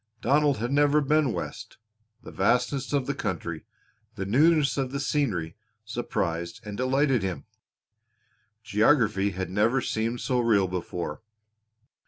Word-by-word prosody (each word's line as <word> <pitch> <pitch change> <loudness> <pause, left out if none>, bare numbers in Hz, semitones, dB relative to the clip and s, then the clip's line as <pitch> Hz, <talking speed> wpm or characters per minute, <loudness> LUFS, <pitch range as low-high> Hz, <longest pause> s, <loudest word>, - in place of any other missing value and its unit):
Donald 145 +1 +2
had 120 +4 -3
never 145 +1 +4
been 150 -1 +2
West. - - -6 0.5
The - - -10
vastness 125 +7 0
of 140 -3 +1
the 140 - -1
country, 85 - -4 0.5
the 95 -3 -4
newness 145 - +3
of 135 -2 -2
the 140 - -3
scenery 120 - -1 0.3
surprised 95 -5 -3
and 105 -1 -6
delighted 130 +1 +1
him. 95 -6 -4 1.2
Geography 105 -3 +2
had 95 -2 -5
never 110 +7 +2
seemed 115 0 -2
so 125 -2 0
real 110 -5 +3
before. 90 -3 -5
120 Hz, 130 wpm, -26 LUFS, 95-140 Hz, 1.2 s, never